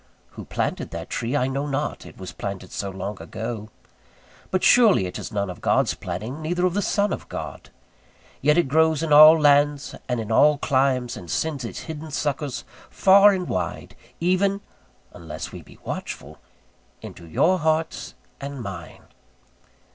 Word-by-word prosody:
Who -, -, -9 dB
planted -, -, -2 dB
that -, -, -7 dB
tree 120 Hz, +4 st, -2 dB
I 125 Hz, -, +1 dB
know 135 Hz, +2 st, -2 dB
not, 145 Hz, +1 st, -3 dB
it -, -, -14 dB
was 95 Hz, -, -7 dB
planted 95 Hz, -2 st, -6 dB
so 100 Hz, -, -4 dB
long 95 Hz, +1 st, -6 dB
ago: 110 Hz, -1 st, -6 dB, 0.8 s
but 185 Hz, -, -1 dB
surely 220 Hz, -, +6 dB
it 90 Hz, -, -5 dB
is -, -, -7 dB
none 100 Hz, -1 st, -1 dB
of 90 Hz, -1 st, -8 dB
God's -, -, +2 dB
planting, 110 Hz, -, -6 dB
neither 175 Hz, +3 st, 0 dB
of 180 Hz, -, +1 dB
the 205 Hz, -, 0 dB
Son 205 Hz, 0 st, +1 dB
of -, -, -7 dB
God: -, -, -7 dB, 0.7 s
yet 150 Hz, +3 st, +3 dB
it 175 Hz, -, +3 dB
grows 160 Hz, +2 st, +3 dB
in 155 Hz, -2 st, +1 dB
all 155 Hz, +2 st, +9 dB
lands 145 Hz, -1 st, +3 dB, 0.2 s
and 125 Hz, -1 st, 0 dB
in 110 Hz, 0 st, -4 dB
all 150 Hz, +6 st, +5 dB
climes, 130 Hz, -3 st, +1 dB
and 85 Hz, -, -10 dB
sends 145 Hz, -, -2 dB
its 115 Hz, -, -6 dB
hidden 160 Hz, 0 st, -7 dB
suckers 145 Hz, -2 st, -2 dB, 0.3 s
far 200 Hz, +2 st, +6 dB
and 185 Hz, -2 st, -2 dB
wide, 90 Hz, -, -4 dB, 0.2 s
even 195 Hz, +3 st, +1 dB, 0.5 s
(unless 80 Hz, -3 st, -7 dB
we -, -, -9 dB
be -, -, -17 dB
watchful) -, -, -6 dB, 0.6 s
into 85 Hz, -, -10 dB
your 175 Hz, -, +2 dB
hearts 160 Hz, +1 st, -1 dB, 0.2 s
and 140 Hz, -2 st, -6 dB
mine. 85 Hz, -6 st, -8 dB
145 Hz, 165 wpm, -24 LUFS, 110-160 Hz, 0.8 s, all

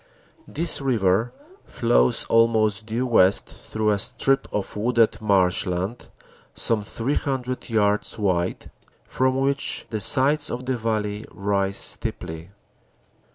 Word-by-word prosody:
This 165 Hz, -1 st, 0 dB
river 115 Hz, -3 st, +1 dB, 0.3 s
flows 120 Hz, 0 st, +1 dB
almost 110 Hz, -2 st, +2 dB
due 115 Hz, +3 st, -2 dB
west 100 Hz, -6 st, +3 dB
through 110 Hz, -1 st, -3 dB
a 100 Hz, -, 0 dB
strip 135 Hz, +4 st, 0 dB
of 105 Hz, -, -3 dB
wooded 115 Hz, +1 st, +1 dB
marsh 95 Hz, -3 st, +2 dB
land 95 Hz, +6 st, -4 dB, 0.5 s
some 115 Hz, -2 st, 0 dB
300 130 Hz, +3 st, -3 dB
yards 105 Hz, -2 st, 0 dB
wide, 90 Hz, -4 st, -2 dB, 0.3 s
from 130 Hz, 0 st, 0 dB
which 140 Hz, +1 st, -1 dB
the 110 Hz, -, -2 dB
sides 145 Hz, +7 st, +4 dB
of 125 Hz, +2 st, -5 dB
the 130 Hz, 0 st, -1 dB
valley 110 Hz, -2 st, -3 dB
rise 100 Hz, 0 st, -1 dB
steeply. 80 Hz, +2 st, -1 dB
110 Hz, 115 wpm, -23 LUFS, 100-125 Hz, 0.5 s, sides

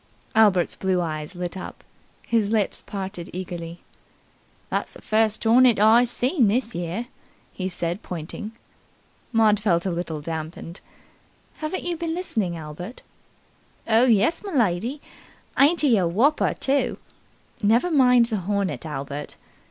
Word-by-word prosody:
Albert's 205 Hz, -5 st, +4 dB
blue 190 Hz, -1 st, 0 dB
eyes 155 Hz, 0 st, -4 dB
lit 175 Hz, +1 st, -4 dB
up. 185 Hz, -, -8 dB, 0.4 s
His 220 Hz, -3 st, +1 dB
lips 215 Hz, -3 st, 0 dB
parted 190 Hz, -3 st, -5 dB
eagerly, 175 Hz, -2 st, -6 dB, 0.9 s
"That's -, -, -2 dB
the -, -, -13 dB
first 220 Hz, 0 st, +1 dB
hornet 240 Hz, +1 st, +5 dB
I 220 Hz, +4 st, +6 dB
seen 245 Hz, -, +2 dB
this 235 Hz, +3 st, 0 dB
year," 175 Hz, +7 st, -3 dB, 0.5 s
he 185 Hz, -1 st, -3 dB
said 175 Hz, +2 st, -3 dB
pointing. 180 Hz, +6 st, -6 dB, 0.8 s
Maud 220 Hz, -3 st, +4 dB
felt 175 Hz, -5 st, +1 dB
a 190 Hz, -, 0 dB
little 170 Hz, -2 st, -3 dB
damped. 160 Hz, +2 st, -6 dB, 0.8 s
"Haven't 310 Hz, +4 st, -4 dB
you 345 Hz, -1 st, -2 dB
been 330 Hz, 0 st, -3 dB
listening, 215 Hz, -, -1 dB
Albert?" 160 Hz, -, -8 dB, 0.8 s
"Oh, 230 Hz, +2 st, +5 dB
yes, 235 Hz, +7 st, +3 dB
m'lady! 250 Hz, -, 0 dB, 0.6 s
Ain't 310 Hz, +5 st, +5 dB
he 265 Hz, -7 st, +4 dB
a 180 Hz, -, +1 dB
wopper, 240 Hz, -, +2 dB
too?" 275 Hz, +1 st, 0 dB, 0.6 s
"Never 230 Hz, +11 st, +3 dB
mind 250 Hz, -5 st, +5 dB
the 225 Hz, -2 st, -2 dB
hornet, 195 Hz, -2 st, -2 dB
Albert." 140 Hz, 0 st, -5 dB
210 Hz, 130 wpm, -24 LUFS, 175-245 Hz, 0.9 s, I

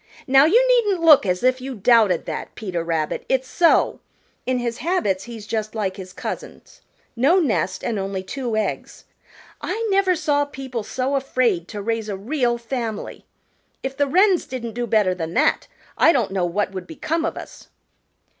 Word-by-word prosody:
Now 270 Hz, +2 st, +6 dB
you 470 Hz, +10 st, +4 dB
needn't 420 Hz, -8 st, +2 dB
look 300 Hz, -10 st, +7 dB
as 180 Hz, +2 st, -1 dB
if 255 Hz, 0 st, +2 dB
you 265 Hz, 0 st, -5 dB
doubted 210 Hz, -4 st, +3 dB
that, -, -, -6 dB
Peter 180 Hz, -6 st, -4 dB
Rabbit; 165 Hz, -2 st, -2 dB
it's 260 Hz, 0 st, +1 dB
so. 340 Hz, +3 st, +3 dB, 0.5 s
In 255 Hz, 0 st, +1 dB
his 240 Hz, 0 st, -3 dB
habits 210 Hz, -, 0 dB
he's 230 Hz, -3 st, -9 dB
just 215 Hz, 0 st, -3 dB
like 195 Hz, -4 st, -2 dB
his 185 Hz, -1 st, -9 dB
cousins, -, -, -8 dB, 0.3 s
no 275 Hz, +10 st, +4 dB
nest 295 Hz, -, 0 dB
and 220 Hz, -4 st, -2 dB
only 195 Hz, -1 st, -3 dB
two 245 Hz, +2 st, -4 dB
eggs. 215 Hz, -, -4 dB, 0.6 s
I 455 Hz, +1 st, -3 dB
never 385 Hz, -2 st, +3 dB
saw 290 Hz, -3 st, +1 dB
people 265 Hz, -4 st, -6 dB
so 260 Hz, +6 st, -2 dB
afraid 245 Hz, -10 st, 0 dB
to 205 Hz, -2 st, -6 dB
raise 225 Hz, 0 st, -2 dB
a 200 Hz, -, -3 dB
real 240 Hz, +3 st, 0 dB
family. 235 Hz, -3 st, -5 dB, 0.6 s
If 265 Hz, 0 st, -4 dB
the 285 Hz, 0 st, +1 dB
Wrens 370 Hz, +4 st, +3 dB
didn't 235 Hz, -3 st, -5 dB
do 240 Hz, +1 st, -3 dB
better 210 Hz, -4 st, +2 dB
than 165 Hz, -2 st, -5 dB
that, 300 Hz, +5 st, +2 dB, 0.3 s
I 330 Hz, -, +7 dB
don't 240 Hz, -, 0 dB
know 190 Hz, -2 st, 0 dB
what 190 Hz, +3 st, -1 dB
would 185 Hz, -2 st, -7 dB
become 320 Hz, -, -2 dB
of 330 Hz, -, -2 dB
us." -, -, -11 dB
240 Hz, 175 wpm, -22 LUFS, 200-285 Hz, 0.6 s, look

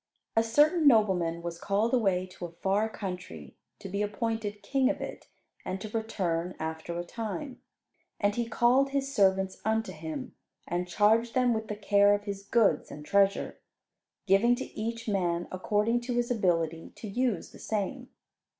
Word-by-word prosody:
A 225 Hz, -, +5 dB
certain 295 Hz, +8 st, +4 dB
nobleman 180 Hz, -9 st, +3 dB
was 170 Hz, 0 st, -5 dB
called 210 Hz, +4 st, 0 dB
away 195 Hz, -7 st, +2 dB
to 180 Hz, -1 st, -8 dB
a 170 Hz, -, -8 dB
far 200 Hz, +5 st, 0 dB
country 180 Hz, -, -7 dB, 0.2 s
to -, -, -8 dB
be 200 Hz, +2 st, -2 dB
appointed 210 Hz, 0 st, -2 dB
king 270 Hz, -1 st, +2 dB
of 290 Hz, -, -1 dB
it, -, -, -7 dB, 0.4 s
and 190 Hz, -, -4 dB
to 215 Hz, -, -6 dB
return 185 Hz, -6 st, -1 dB
after 160 Hz, +2 st, -4 dB
a 175 Hz, -, -2 dB
time. 230 Hz, -, -5 dB, 0.6 s
And 205 Hz, 0 st, +2 dB
he 235 Hz, +1 st, -2 dB
called 250 Hz, +4 st, +3 dB
his 275 Hz, 0 st, -2 dB
servants 190 Hz, -3 st, +2 dB
unto 220 Hz, +1 st, 0 dB
him, 155 Hz, -3 st, -6 dB, 0.3 s
and 175 Hz, +1 st, -2 dB
charged 220 Hz, +5 st, +3 dB
them 250 Hz, -2 st, +3 dB
with 220 Hz, -1 st, -3 dB
the 210 Hz, -, -3 dB
care 205 Hz, 0 st, +4 dB
of 205 Hz, -, -5 dB
his 200 Hz, -1 st, -5 dB
goods 200 Hz, -6 st, +2 dB
and 150 Hz, 0 st, -9 dB
treasure, 200 Hz, +1 st, +2 dB, 0.7 s
giving 210 Hz, +5 st, +4 dB
to 265 Hz, -, -5 dB
each 230 Hz, +1 st, -4 dB
man 175 Hz, -4 st, 0 dB
according 210 Hz, +5 st, +1 dB
to 240 Hz, 0 st, -3 dB
his 240 Hz, 0 st, 0 dB
ability 165 Hz, -7 st, 0 dB
to 220 Hz, -, -8 dB
use 235 Hz, -2 st, -1 dB
the -, -, -14 dB
same. 205 Hz, -3 st, -3 dB
205 Hz, 170 wpm, -29 LUFS, 180-230 Hz, 0.7 s, A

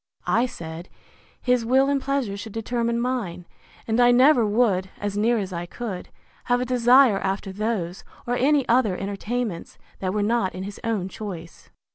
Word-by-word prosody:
I 245 Hz, +2 st, +2 dB
said, 165 Hz, -4 st, -8 dB, 0.5 s
His 250 Hz, -2 st, +2 dB
will 260 Hz, +4 st, +3 dB
and 280 Hz, -1 st, +1 dB
pleasure 270 Hz, -7 st, -1 dB
should 205 Hz, +1 st, -8 dB
determine 235 Hz, +1 st, -1 dB
mine; 230 Hz, -9 st, -2 dB, 0.4 s
and 225 Hz, +1 st, +1 dB
I 245 Hz, 0 st, +6 dB
never 250 Hz, +1 st, +6 dB
would, 205 Hz, -4 st, +1 dB
as 205 Hz, -1 st, -3 dB
near 230 Hz, +3 st, +2 dB
as 195 Hz, -3 st, -3 dB
I 170 Hz, 0 st, -4 dB
could, 200 Hz, -2 st, -6 dB, 0.4 s
have 245 Hz, 0 st, +2 dB
a 250 Hz, -, -1 dB
desire 250 Hz, -2 st, +5 dB
after 195 Hz, 0 st, -2 dB
those, 200 Hz, -4 st, -3 dB, 0.2 s
or 240 Hz, -, -1 dB
any 275 Hz, +1 st, +2 dB
other 230 Hz, -6 st, +3 dB
entertainments 205 Hz, 0 st, -4 dB, 0.2 s
that 185 Hz, -1 st, -1 dB
were 210 Hz, +1 st, 0 dB
not 210 Hz, -4 st, 0 dB
in 185 Hz, -, -5 dB
his 200 Hz, +1 st, -7 dB
own 215 Hz, -5 st, -1 dB
choice. 180 Hz, -5 st, -8 dB
225 Hz, 170 wpm, -24 LUFS, 190-245 Hz, 0.5 s, I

